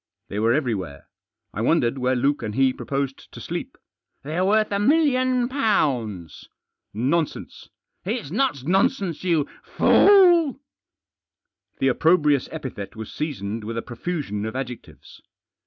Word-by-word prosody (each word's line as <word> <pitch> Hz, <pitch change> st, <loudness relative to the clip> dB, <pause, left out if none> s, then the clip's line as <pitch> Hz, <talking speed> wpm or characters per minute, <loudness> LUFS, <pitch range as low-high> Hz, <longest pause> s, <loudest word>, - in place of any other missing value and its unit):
They 100 Hz, -, -3 dB
were 115 Hz, +2 st, +2 dB
everywhere. 105 Hz, -, -2 dB, 0.5 s
I -, -, -4 dB
wondered 130 Hz, -1 st, +1 dB
where 130 Hz, 0 st, +1 dB
Luke 140 Hz, +4 st, +1 dB
and 110 Hz, -2 st, -4 dB
he 135 Hz, -1 st, +3 dB
proposed 135 Hz, 0 st, -4 dB
to -, -, -9 dB
sleep. -, -, -6 dB, 0.2 s
" -, -, -53 dB
They're 160 Hz, +6 st, -2 dB
worth 215 Hz, +2 st, +2 dB
a 200 Hz, -, 0 dB
million 255 Hz, -1 st, +2 dB
pounds." 130 Hz, -, -1 dB, 0.2 s
" -, -, -59 dB, 0.2 s
Nonsense! 170 Hz, -2 st, -3 dB
" -, -, -62 dB
" -, -, -51 dB
It's 215 Hz, -, -3 dB
not 210 Hz, -, 0 dB
nonsense, 190 Hz, -, 0 dB
you 165 Hz, -5 st, +1 dB
fool." 350 Hz, -8 st, +5 dB, 1.2 s
The 135 Hz, -, +2 dB
opprobrious 150 Hz, -1 st, +2 dB
epithet 130 Hz, -10 st, -7 dB
was 110 Hz, -1 st, -8 dB
seasoned 115 Hz, -8 st, -4 dB
with 115 Hz, +2 st, -5 dB
a 115 Hz, -, -3 dB
profusion 125 Hz, -, -4 dB
of 110 Hz, -, -6 dB
adjectives. 125 Hz, -2 st, -8 dB
145 Hz, 140 wpm, -23 LUFS, -, 1.2 s, fool